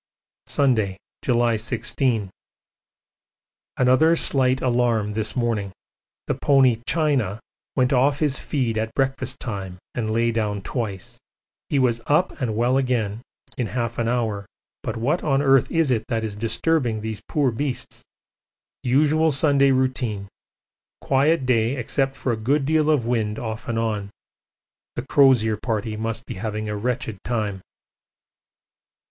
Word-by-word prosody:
Sunday, 110 -9 +1 0.2
July 120 -2 +2
16. 115 -1 -1 1.5
Another 130 +6 +4
slight 130 -4 +3
alarm 120 -4 +1
this 110 0 -3
morning. 115 -5 -1 0.5
The - - 0
pony 130 -5 +3
'China' 140 - +1 0.4
went 130 +1 +2
off 135 +3 +3
his 145 -2 +1
feed 120 -6 -1
at 110 0 -3
breakfast 135 -1 -1
time 95 -5 -5 0.2
and 110 -3 -2
lay 115 +1 +1
down 105 -3 -2
twice. 105 -5 -4 0.5
He 145 - +1
was 120 -3 +2
up 150 +5 +3
and 115 -4 -1
well 120 +3 +2
again 120 -5 -1 0.4
in 120 - 0
half 115 +2 -3
an 115 - 0
hour; 110 -5 -1 0.3
but 115 - -4
what 140 +10 0
on 135 -3 +2
earth 135 -2 +4
is 165 -5 +2
it 115 -3 0
that 115 -1 -1
is 105 -2 -4
disturbing 115 +1 0
these 110 -1 -5
poor 140 -4 +1
beasts? 135 +2 -4 0.8
Usual 155 +5 +3
Sunday 140 -1 +4
routine. 130 -6 0 0.7
Quiet 140 +2 +2
day 120 0 +2
except 135 +2 -1
for 130 - -2
a - - 0
good 135 +6 +1
deal 155 +1 +2
of 145 -7 +2
wind 110 -3 -1
off 110 0 -5
and 115 - -2
on. 110 -3 -1 0.9
The 120 - -4
Crozier 130 -6 +4
Party 110 -1 -2
must 115 +1 -3
be - - -6
having 110 -1 -3
a 105 - -3
wretched 115 -1 -3
time. 105 -5 -2
120 Hz, 140 wpm, -23 LUFS, 110-135 Hz, 1.5 s, Another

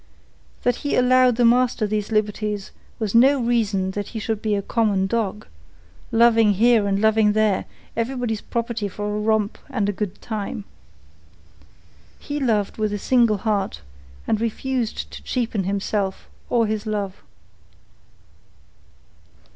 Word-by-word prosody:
That 245 -1 +2
he 285 - -2
allowed 250 -1 +4
the 240 0 +3
master 245 -1 +3
these 210 0 -2
liberties 210 -1 -1 0.3
was 215 -4 -2
no 265 +4 +5
reason 215 -6 0
that 205 +1 -4
he 225 - -6
should 215 0 -2
be 215 -2 0
a 200 - -2
common 210 -4 +1
dog, 210 0 -2 0.7
loving 225 -2 +5
here 225 0 +4
and 195 0 +1
loving 220 0 +3
there, 215 -3 +2 0.3
everybody's 230 -2 -2
property 235 -3 -3
for 205 +2 -4
a - - -1
romp 215 0 0
and 205 -7 -1
good 205 -3 -4
time. 210 -2 -5 1.5
He 290 0 -5
loved 215 -7 0
with 210 -1 -1
single 235 -2 +3
heart 200 - -1 0.4
and 220 -1 0
refused 235 +1 -2
to - - -9
cheapen 230 -6 -2
himself 195 0 -2 0.2
or 235 -2 +3
his 215 0 -3
love. 200 -3 -3
215 Hz, 130 wpm, -22 LUFS, 205-235 Hz, 1.5 s, no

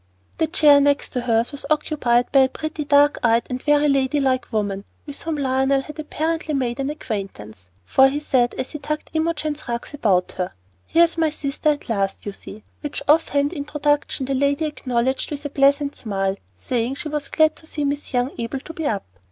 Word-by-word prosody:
The 320 - +2
chair 295 -3 +6
next 285 0 +1
hers 240 -2 +1
was 285 - -7
occupied 285 -6 +1
by 275 - +5
a 265 -1 +5
pretty, 310 +2 -4
dark 290 0 +4
eyed, 230 -1 +3
and 250 0 -3
very 295 0 +3
lady 275 0 +2
like 260 -3 0
woman, 200 -3 -1 0.2
with 285 -2 -7
whom 325 -2 -3
Lionel 265 0 +2
had 300 +2 -10
apparently 315 0 -2
made 250 -2 -1
an 275 +1 -1
acquaintance; 195 - -6 0.2
for 265 - +5
he 285 +2 -2
said, 255 -5 +1
as 260 - -4
he 300 - -6
tucked 300 +2 -4
Imogen's 310 -2 -2
rugs 235 +4 -4
about 195 -10 +1
her, 180 - -2 0.3
"Here's 335 0 +3
my 320 -1 +3
sister 295 0 -2
at 295 -1 -1
last, 200 -4 -1
you 205 - -3
see;" 205 +2 -11 0.2
which 295 -2 -4
off 315 +3 +4
hand 285 +2 +1
introduction 290 -2 -1
the 270 - -2
lady 280 +3 +1
acknowledged 260 -3 -1
with 290 -1 -6
a - - -2
pleasant 280 +1 +2
smile, 195 -3 -2 0.2
saying 240 - -2
she 300 - -6
was 300 -2 -3
glad 315 0 +3
to 320 - -9
see 295 -2 -2
Miss 285 +1 -3
Young 250 +1 0
able 235 +3 -3
to 325 - -9
be 320 -2 -3
up. 205 -6 -2
280 Hz, 200 wpm, -22 LUFS, 245-300 Hz, 0.3 s, chair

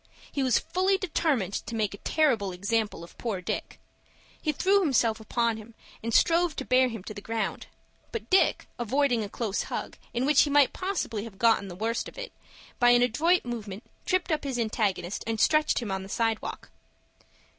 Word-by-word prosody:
He 280 - -2
was 255 -3 +3
fully 370 +4 +1
determined 300 - 0
to 230 - -4
make 215 -3 0
a 200 - -9
terrible 245 -11 +1
example 200 0 -1
of 170 - -13
poor 220 -6 -2
Dick. 180 - -4 0.6
He 305 - +1
threw 390 +7 +3
himself 235 - +2
upon 230 +1 0
him, 220 +1 -12 0.3
and 230 - -3
strove 335 +3 +3
to 265 - -4
bear 255 0 +4
him 225 -6 -6
to 215 - -7
the 205 - -8
ground; 225 +1 -3 0.4
but 455 - -5
Dick, 380 - +3
avoiding 245 0 +1
a 205 - -5
close 215 -2 -2
hug, - - -5
in 245 +2 -1
which 295 0 +5
he 295 - +2
might 285 -2 +4
possibly 360 - -2
have 210 -4 -11
got 230 +1 +4
the 180 - -8
worst 225 +5 -2
of - - -18
it, - - -6 0.5
by 245 - +6
an 245 0 +6
adroit 315 +9 +2
movement, 220 -3 -5 0.2
tripped 365 -1 +1
up 310 - 0
his 270 -3 -2
antagonist, 210 -5 -1
and 225 -1 -1
stretched 305 -1 +3
him 210 - -4
on 190 0 -2
the 190 - -9
side 225 0 0
walk. - - -7
235 Hz, 195 wpm, -27 LUFS, 215-300 Hz, 0.6 s, by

